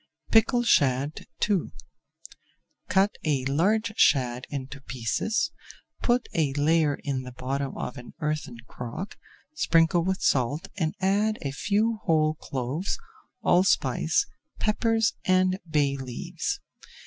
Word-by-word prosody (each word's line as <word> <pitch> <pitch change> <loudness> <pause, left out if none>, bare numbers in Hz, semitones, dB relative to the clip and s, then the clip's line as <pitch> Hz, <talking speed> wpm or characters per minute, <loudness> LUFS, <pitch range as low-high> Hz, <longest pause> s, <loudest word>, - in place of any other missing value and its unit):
PICKLED 240 +2 +4
SHAD 140 - +2 0.2
II 200 -4 0 1.2
Cut 195 +2 +4
a 140 -4 0
large 210 +11 +1
shad 125 -3 +3
into 140 -1 -6
pieces, 130 - -1 0.5
put 245 0 +2
a 150 -4 +1
layer 150 0 +3
in 135 -3 -1
the 125 -1 -9
bottom 135 +2 -3
of 125 - -5
an 120 - -12
earthen 150 -5 -2
crock, 125 - -6 0.4
sprinkle 170 - +3
with 190 +2 0
salt, 140 +4 +1
and 160 -5 -1
add 205 +3 +2
a 140 - -2
few 210 +8 0
whole 155 -1 +3
cloves, 140 +4 -3 0.5
allspice, 195 - +3 0.3
peppers, 225 0 +2
and 185 0 +3
bay 145 -3 +2
leaves. 170 - -4
155 Hz, 115 wpm, -27 LUFS, 135-200 Hz, 1.2 s, PICKLED